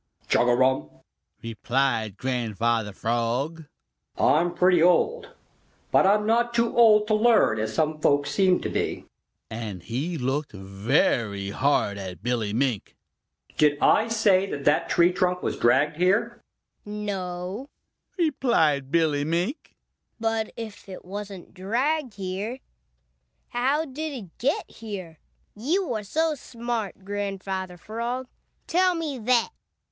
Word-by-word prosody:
"Chugarum!" 125 - +2 0.5
replied 115 -2 -1
Grandfather 115 -3 -1
Frog. 120 +10 -2 0.5
"I'm 170 +3 +3
pretty 180 -2 +4
old, 420 - +3 0.6
but - - +5
I'm 210 +1 +3
not 235 +2 +1
too 235 0 +1
old 215 -3 +6
to 215 - 0
learn 215 - +4
as 110 - -3
some 155 -1 0
folks 145 -1 +2
seem 190 -2 +3
to - - -3
be," - - -2 0.5
and 105 -6 -6
he 140 - -3
looked 135 +2 -2
very 100 0 0
hard 115 -6 +1
at 95 0 -8
Billy 115 -4 -1
Mink. 120 -2 -1 0.6
"Did 150 -1 +4
I 220 - +4
say 205 -4 +3
that 140 - -5
that 150 - +2
tree 175 0 +4
trunk 180 0 0
was - - -1
dragged 150 +6 +2
here?" 185 +4 +1 0.4
"No," 200 +2 -5 0.5
replied 235 - +2
Billy 155 -2 +2
Mink, 175 - -2 0.4
"but 225 -1 -1
if 220 -3 -8
it 185 - -9
wasn't 195 -1 -8
dragged 250 +7 -1
here, 200 +5 -4 0.9
how 270 +6 +1
did 305 +2 -5
it 200 -11 -9
get 320 - 0
here? 190 -8 -8 0.4
You 295 - 0
are 215 - -2
so 315 +10 0
smart, 235 -7 -5
Grandfather 195 -2 -4
Frog, 235 +6 -4 0.4
tell 365 +1 +2
me 305 -6 -3
that!" 235 +1 +2
185 Hz, 125 wpm, -25 LUFS, 135-230 Hz, 0.9 s, old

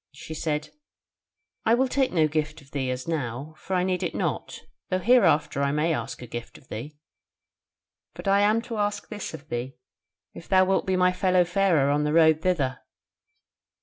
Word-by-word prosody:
She 150 +3 -9
said, 150 -1 -2 0.9
'I 225 - +4
will 260 +2 +2
take 265 0 +1
no 160 -3 +3
gift 155 0 -2
of 140 -2 -19
thee 135 -3 -2
as 125 +2 -4
now, 145 -2 -3
for 190 - -3
I 180 - +2
need 185 -1 0
it - - -3
not, - - -3 0.3
though 185 - +1
hereafter 185 - +3
I 140 0 +1
may 155 +3 +1
ask 135 - -5
a - - -6
gift 120 0 -7
of 130 - -21
thee. 145 +7 -7 1.2
But - - -8
I 200 +1 +4
am 215 +3 +3
to 230 -1 -5
ask 205 0 -2
this 210 -2 -5
of 150 +3 -14
thee, 120 +3 -4 0.6
if 165 - -11
thou 185 -1 +5
wilt 190 0 +1
be 190 - +2
my 180 0 +4
fellow 185 -1 +3
farer 175 -6 +2
on 145 +1 +1
the 150 0 0
road 160 -1 +5
thither?' 140 -9 0
160 Hz, 190 wpm, -26 LUFS, 145-190 Hz, 1.2 s, thou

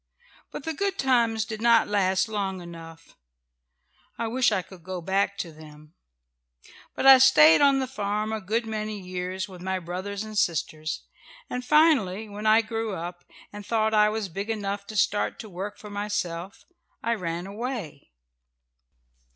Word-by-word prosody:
But - - -8
the 320 - -3
good 395 +3 -2
times 235 - +2
did 220 -1 -6
not 235 -1 +5
last 190 -2 +1
long 200 -3 -3
enough. 165 -2 -11 1.0
I 230 - -2
wish 245 +1 +2
I 190 -3 0
could 185 -2 -14
go 185 +2 -5
back 195 +3 0
to 170 -4 -4
them. 155 0 -15 1.0
"But - - -2
I 270 -1 +10
stayed 160 -12 +7
on 280 -1 +5
the 265 - 0
farm 210 -3 -2
a 220 - -3
good 225 +5 -1
many 215 -1 -4
years, 185 +1 -4
with 185 -3 -12
my 190 +1 -1
brothers 185 +4 -5
and 215 0 -8
sisters, 155 -4 -1 0.5
and 250 - -3
finally 250 - +3
when 210 +1 -5
I 220 +1 +6
grew 225 -2 -3
up, 175 +1 -7 0.3
and 205 0 -8
thought 220 +1 0
I 210 0 +5
was 215 -1 -2
big 195 +5 -5
enough 200 -2 -3
to 215 - -8
start 210 0 +1
to 220 - -10
work 195 +4 -6
for 210 - -11
myself, 200 -3 -4 0.4
I 235 - +1
ran 175 -4 -3
away." 205 - -6
205 Hz, 165 wpm, -26 LUFS, 185-225 Hz, 1.0 s, I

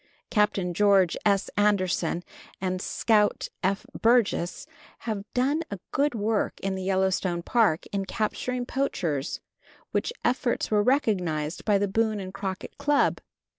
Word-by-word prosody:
Captain 205 -4 +1
George 195 -2 +4
S. 200 -1 +2
Anderson 185 -4 +1 0.4
and 185 -1 -2
Scout 210 -1 +1
F. 195 +2 0 0.2
Burgess 230 -4 +2 0.4
have 215 -3 -4
done 275 +6 +2
a 200 - -4
good 285 -1 +1
work 215 0 0
in 195 0 -1
the 190 - -4
Yellowstone 185 -2 0
Park 215 -9 +2
in 195 -1 -1
capturing 245 +5 -2
poachers, 175 - -2 0.5
which - - 0
efforts 245 -2 0
were 210 -1 +4
recognized 185 - 0
by 210 -2 +4
the 200 +1 +1
Boone 215 +1 +1
and 185 -1 -7
Crockett 190 -2 -5
Club. 290 0 +2
200 Hz, 130 wpm, -26 LUFS, 185-225 Hz, 0.5 s, George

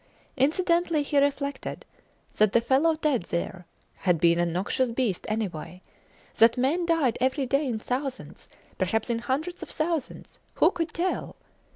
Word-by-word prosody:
Incidentally 335 +2 +2
he 285 0 +2
reflected 280 0 -2 0.5
that 215 -2 +4
the 235 - +6
fellow 275 +7 +3
dead 300 -6 +1
there 175 +1 -4 0.3
had 180 -4 +1
been 170 +1 +4
a 175 - +2
noxious 190 +9 0
beast 230 -6 -1
anyway; 180 -5 -4 0.6
that 230 +1 +5
men 310 +8 +1
died 310 -8 +2
every 265 +2 +1
day 275 +3 +1
in 235 -3 -1
thousands; 260 +4 -5 0.3
perhaps 215 +5 0
in 230 - 0
hundreds 310 +9 -3
of - - -7
thousands 320 -3 -3 0.2
who - - +4
could 335 -3 -3
tell? 355 +4 -2
260 Hz, 150 wpm, -26 LUFS, 215-310 Hz, 0.6 s, the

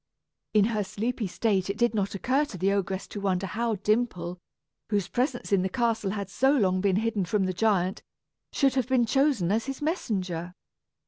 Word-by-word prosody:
In 210 -1 +6
her 210 -1 0
sleepy 215 +3 -2
state, 195 -1 0
it 200 - -2
did 240 0 +2
not 200 -2 -1
occur 260 +8 +1
to 205 - -9
the 190 +3 +1
ogress 190 -1 -1
to 205 - -6
wonder 190 -1 0
how 225 +4 -1
Dimple, 200 -4 -1 0.5
whose 205 -4 0
presence 250 -2 -2
in 195 -2 +4
the 190 - -1
castle 230 -2 0
had 200 -1 -3
so 260 +9 +2
long 185 -8 +2
been 195 -2 +2
hidden 215 -1 0
from 195 +3 0
the 185 - -1
giant, 190 -2 +1 0.5
should 275 -3 +2
have 260 -2 0
been 255 -2 +3
chosen 270 - +2
as 225 +4 0
his 270 -1 -4
messenger. 185 - -2
205 Hz, 190 wpm, -27 LUFS, 190-240 Hz, 0.5 s, In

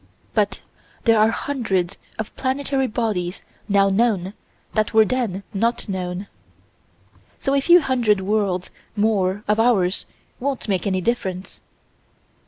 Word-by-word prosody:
But - - 0 0.4
there 225 -2 +4
are 215 +1 +5
hundreds 200 -9 -1 0.2
of 220 - -5
planetary 270 0 0
bodies 210 -6 -2 0.3
now 195 -1 +4
known 195 -3 +1 0.4
that 215 0 0
were 220 -1 +7
then 220 -6 -1
not 230 +5 0
known. 185 -1 -3 1.1
So 275 - -1
a 280 - +3
few 345 +5 +6
hundred 240 -8 +2
worlds 190 -2 0 0.2
more 205 -2 +1
of 210 +1 +2
ours 200 -6 +2 0.3
won't 270 -1 -2
make 195 -2 0
any 190 -1 0
difference. 190 -4 -3
215 Hz, 125 wpm, -22 LUFS, 190-240 Hz, 1.1 s, were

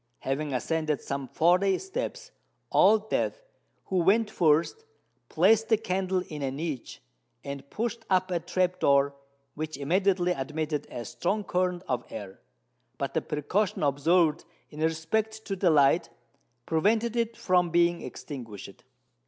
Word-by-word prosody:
Having 145 +2 -2
ascended 155 +3 -1
some 140 -1 -4
forty 180 +6 +3
steps, - - -5 0.4
Old 215 +2 +5
Death, - - -1 0.4
who 190 - -1
went 210 +5 +3
first, 165 - +2 0.5
placed 225 0 +3
the 220 - +5
candle 185 -2 -1
in 150 -2 -7
a 135 - -1
niche, 140 -3 -5 0.4
and 140 0 -7
pushed 230 0 -3
up 185 -1 +2
a 175 - +1
trap 180 +2 -1
door, 140 0 +3 0.4
which 155 -1 -5
immediately 180 +4 +1
admitted 150 0 -3
a 120 - -6
strong 200 - -2
current 180 -1 -1
of 125 -1 -1
air: 100 -3 -8 0.6
but - - -3
the - - +1
precaution 170 +6 -1
observed 150 +3 +2 0.3
in 150 - -10
respect 215 +8 -1
to 195 - -2
the 180 -1 +2
light, 145 -2 +4 0.6
prevented 220 +8 +1
it 230 -1 -1
from 180 -2 +2
being 170 0 +2
extinguished. 120 - -9
175 Hz, 135 wpm, -28 LUFS, 150-200 Hz, 0.6 s, Old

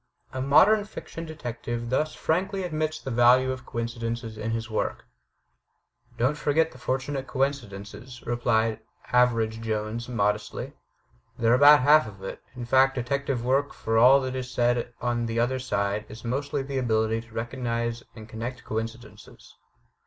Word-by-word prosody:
A 130 - -3
modern 195 +11 +5
fiction 165 -5 -8
detective 120 -5 -5
thus 155 +4 0
frankly 190 +4 -1
admits 155 -2 -2
the 135 - -6
value 125 +2 +5
of 130 -1 -7
coincidences 115 -1 -4
in 110 +1 -4
his 115 0 -2
work: 110 - -3 1.1
"Don't 130 +5 +2
forget 160 +2 +2
the 130 - -14
fortunate 135 +2 -2
coincidences," 120 -3 -4
replied 115 -2 +1 0.3
Average 115 -3 +2
Jones 110 +2 -3
modestly. 105 -2 -1 0.6
"They're 115 0 +3
about 145 +3 +8
half 150 +2 +5
of 100 -2 -11
it. - - -6
In 125 -1 -5
fact, 135 +2 +4
detective 130 0 -2
work, 135 +3 +1
for 110 0 0
all 130 +4 +7
that 130 -1 -3
is 130 -1 -4
said 120 0 +1
on 120 -1 -1
the 115 0 -1
other 130 +2 +1
side, 105 -4 -1
is 110 +2 -10
mostly 140 +3 -2
the 135 0 -3
ability 110 -2 +1
to 115 -1 -18
recognize 115 0 -2
and 110 -2 -10
connect 120 +3 -6
coincidences." 115 +1 -7
120 Hz, 150 wpm, -26 LUFS, 115-135 Hz, 1.1 s, about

